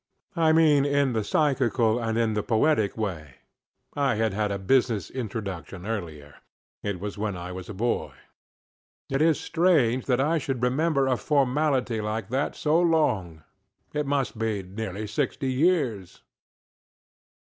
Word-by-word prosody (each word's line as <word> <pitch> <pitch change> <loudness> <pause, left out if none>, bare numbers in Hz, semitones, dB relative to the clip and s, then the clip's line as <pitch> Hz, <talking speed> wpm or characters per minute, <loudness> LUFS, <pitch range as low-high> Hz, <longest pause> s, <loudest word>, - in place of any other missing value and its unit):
I 165 -2 +3
mean, 155 -3 +5
in 140 -2 +1
the 110 -2 0
psychical 120 -3 +1
and 115 -1 -1
in 115 -2 +1
the 105 - 0
poetical 110 -2 +1
way. 75 -10 -5 0.6
I 140 -5 +1
had 110 -1 0
had 105 0 -1
a 100 - -1
business 110 -2 +1
introduction 100 -6 -5
earlier. 80 -10 -6 0.4
It 100 -3 -3
was 100 +1 -6
when 105 -3 -2
I 90 +1 -6
was 90 0 -8
a 105 - -6
boy. 120 +4 -1 1.0
It 135 +2 +1
is 160 -1 +3
strange 155 -8 +2
that 125 -2 +2
I 155 +4 +2
should 130 -3 -3
remember 140 +3 +2
a 130 -2 +1
formality 135 -4 +1
like 105 0 -3
that 135 +4 -1
so 155 +2 +2
long; 105 - +1 0.5
it 150 -1 -1
must 140 -5 -1
be 110 -3 -1
nearly 100 +2 -5
sixty 130 +4 -2
years. 130 - 0
115 Hz, 150 wpm, -26 LUFS, 105-140 Hz, 1.0 s, mean